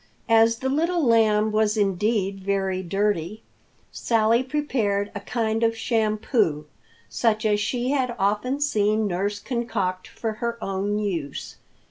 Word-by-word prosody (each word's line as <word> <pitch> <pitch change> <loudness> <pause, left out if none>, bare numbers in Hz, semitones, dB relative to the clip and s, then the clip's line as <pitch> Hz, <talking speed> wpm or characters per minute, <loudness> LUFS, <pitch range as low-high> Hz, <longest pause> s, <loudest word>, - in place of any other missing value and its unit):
As 225 0 +5
the 265 +2 -3
Little 335 +4 +1
Lamb 220 -2 +3
was 215 0 +1
indeed 200 0 0
very 190 -1 -1
dirty, 195 +1 -1 0.5
Sally 230 +1 +2
prepared 245 -8 -1
a 205 - -4
kind 225 +1 -1
of 225 0 +1
shampoo, 215 - 0 0.4
such 220 -2 0
as 210 -1 +2
she 245 +4 -1
had 255 -4 0
often 210 +8 0
seen 215 -5 +1
nurse 200 +2 -1
concoct 205 -6 -3
for 225 - -4
her 235 0 -2
own 195 +1 -2
use. 170 -10 -4
215 Hz, 130 wpm, -24 LUFS, 200-235 Hz, 0.5 s, As